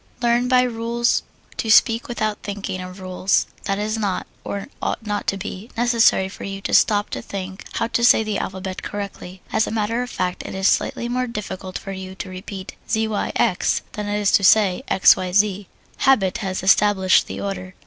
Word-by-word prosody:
Learn 240 +1 +2
by 250 0 +4
rules 235 0 0 0.4
to 225 - -2
speak 225 +2 +5
without 215 -3 -2
thinking 200 -2 -4
of 185 +1 -9
rules. 185 0 +1 0.2
It 195 - +1
is 215 +2 -2
not 200 -3 -1 0.2
or 200 -1 -4 0.2
ought 225 - -2
not 205 -1 -3
to 195 - +1
be 195 +2 -7
necessary 235 -5 +3
for 190 - -10
you 195 0 -5
to - - -4
stop 205 -2 +3
to - - -4
think 190 -1 -7
how - - 0
to 235 - 0
say 235 -2 +6
the 215 -2 -2
alphabet 190 0 -5
correctly, 195 -2 -7
as 220 - +2
a - - -2
matter 225 +2 0
of 250 - -4
fact 180 -5 -2
it - - -7
is 190 +1 +1
slightly 235 - +1
more 250 +1 -1
difficult 190 -4 -5
for 195 - -7
you 190 0 -7
to 190 - -6
repeat 190 +1 -7 0.2
Z, 220 -1 +1
Y, 210 - -1
X 210 -7 +1
than 210 -1 -5
it 205 0 -1
is 205 -1 +2
to 200 - +4
say 195 -1 +5
X, 190 - +6
Y, 185 -1 -4
Z 200 0 +2 0.3
habit 215 -6 +3
has 190 -4 -3
established 190 -1 +4
the - - -6
order. 185 -2 -5
205 Hz, 200 wpm, -22 LUFS, 190-225 Hz, 0.4 s, say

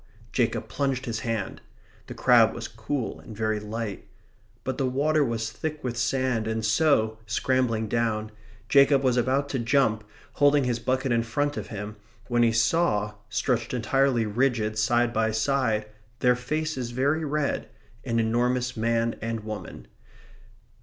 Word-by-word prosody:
Jacob 120 -1 0
plunged 135 -2 -1
his 115 -3 -3
hand. 110 -4 -3 0.5
The - - -8
crab 120 -3 +5
was 115 -1 -5
cool 110 +4 -4
and 110 -4 -11
very 110 -1 0
light. 105 -1 -5 0.6
But 130 -1 -3
the 135 - +1
water 150 +4 +2
was 115 -3 -2
thick 155 +3 -5
with 125 -2 -2
sand, 120 -1 0
and 110 -1 -1
so, 110 -3 +2
scrambling 115 -1 0
down, 110 -1 -1 0.4
Jacob 140 +1 +5
was 130 -2 +3
about 130 +3 +1
to 135 - -1
jump, 115 -3 +2 0.3
holding 145 0 +4
his 120 -2 0
bucket 130 +1 0
in 115 -1 +3
front 145 +6 -1
of - - -5
him, 105 0 -6 0.3
when 120 -1 +2
he 115 -1 +4
saw, 110 -3 +2 0.2
stretched 120 0 -1
entirely 130 -1 +2
rigid, 110 -1 0
side 120 +2 +2
by 110 -1 +2
side, 110 -1 +1 0.3
their 125 -1 +3
faces 130 0 -3
very 140 +6 0
red, 150 -1 -1 0.3
an 115 -2 0
enormous 125 +2 +1
man 115 0 0
and 115 0 -3
woman. 110 0 -7
120 Hz, 150 wpm, -26 LUFS, 110-135 Hz, 0.6 s, crab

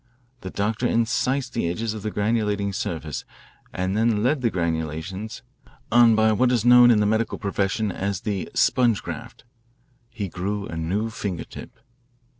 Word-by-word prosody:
The 95 - -7
doctor 105 +5 -1
incised 125 +3 0
the 100 -7 -1
edges 110 +5 -2
of 110 - -6
the 110 - -3
granulating 105 -2 0
surface 80 -5 -4 0.5
and 95 +2 -2
then 110 -1 +2
led 135 +3 +1
the 120 - +2
granulations 85 +4 -3 0.5
on 120 -1 +6
by 110 0 +4
what 125 +4 +2
is 120 -3 +1
known 125 0 +8
in 115 -3 +5
the 105 - +2
medical 110 +2 0
profession 100 +1 -1
as 100 0 -3
the 100 -3 -3
'sponge 120 -5 +3
graft.' - - -8 0.7
He 110 -4 -4
grew 100 +3 -3
a - - -7
new 95 +8 -2
finger 100 -6 -4
tip. - - -11
105 Hz, 160 wpm, -24 LUFS, 95-115 Hz, 0.7 s, known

